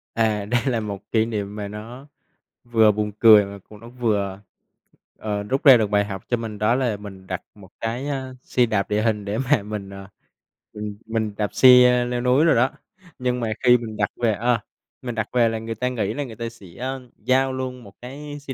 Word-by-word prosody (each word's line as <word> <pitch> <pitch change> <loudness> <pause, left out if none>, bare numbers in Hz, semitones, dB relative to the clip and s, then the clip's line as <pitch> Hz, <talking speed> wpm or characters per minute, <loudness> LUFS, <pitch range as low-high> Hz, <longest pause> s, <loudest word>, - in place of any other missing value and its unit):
À, 110 -3 +1
đây 120 +3 +1
là 125 -4 +1
1 100 -2 -7
kỷ 110 -1 +3
niệm 105 -3 -4
mà 105 -1 -4
nó 115 +7 -9 0.6
vừa 115 -3 +4
buồn 105 0 -2
cười 110 -3 +8
mà, 100 0 -9
kiểu, 105 - -13
nó 115 +2 -12
vừa, 105 -6 -1 0.8
ờ, 105 -1 -3
rút 130 +7 -2
ra 135 -4 +9
được 110 -3 0
bài 105 0 +2
học 95 -2 -6
cho 120 - +1
mình 110 -2 -6
đó 105 +3 +3
là 125 -5 0
mình 95 -2 -11
đặt 95 -1 -4
1 100 -3 -15
cái, 120 +5 -3
à, 135 -2 -4
xe 125 - +2
đạp 105 -4 -1
địa 105 +1 +1
hình 110 -2 0
để 105 +2 -2
mà 130 -2 +1
mình, 105 -2 -6
à, 100 0 -10 0.6
mình 105 -1 -6
mình 110 -2 -2
đạp 105 -2 -2
xe 125 -1 +7
leo 120 0 -2
núi 125 +5 +3
đồ 165 - +4
đó. 125 +3 +3 0.5
Nhưng 125 0 -1
mà 115 -2 -1
khi 125 -1 +7
mình 110 -3 -7
đặt 100 - +1
về 115 -2 +3
ờ, 120 +3 +1 0.4
mình 120 -2 -5
đặt 110 -1 -2
về 120 -2 +4
là 115 0 -3
người 115 0 -5
ta 125 +3 -1
nghĩ 110 -5 -2
là 145 - -3
người 120 -5 -9
ta 115 +1 -4
sẽ 115 -4 -15 0.6
giao 130 +1 +2
luôn 130 -1 -5
1 100 - -14
cái 145 +4 -8
xe 140 -2 -7
115 Hz, 225 wpm, -23 LUFS, 105-125 Hz, 0.8 s, ra